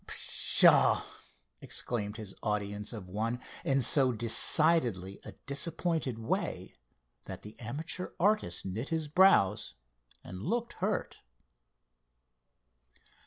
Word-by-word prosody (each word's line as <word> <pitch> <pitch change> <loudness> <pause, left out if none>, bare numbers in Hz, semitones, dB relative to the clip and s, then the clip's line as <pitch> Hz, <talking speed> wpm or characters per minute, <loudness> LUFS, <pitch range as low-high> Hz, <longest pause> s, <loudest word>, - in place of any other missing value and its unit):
"Pshaw!" - - +5 0.6
exclaimed 105 -3 -4
his 105 -4 -8
audience 105 0 -3
of 105 -6 -8
one, 110 +6 -3 0.2
in 135 -1 +1
so 130 +1 +4
decidedly 115 - +1
a - - -10
disappointed 150 -2 -2
way, 115 0 -4 0.5
that - - -9
the 105 +1 -12
amateur 155 +10 -5
artist 190 - 0
knit 105 +8 -5
his 160 -2 -2
brows, 150 - +3 0.5
and 90 +1 -9
looked 235 - -3
hurt. 205 +1 -2
120 Hz, 100 wpm, -30 LUFS, 105-160 Hz, 0.6 s, Pshaw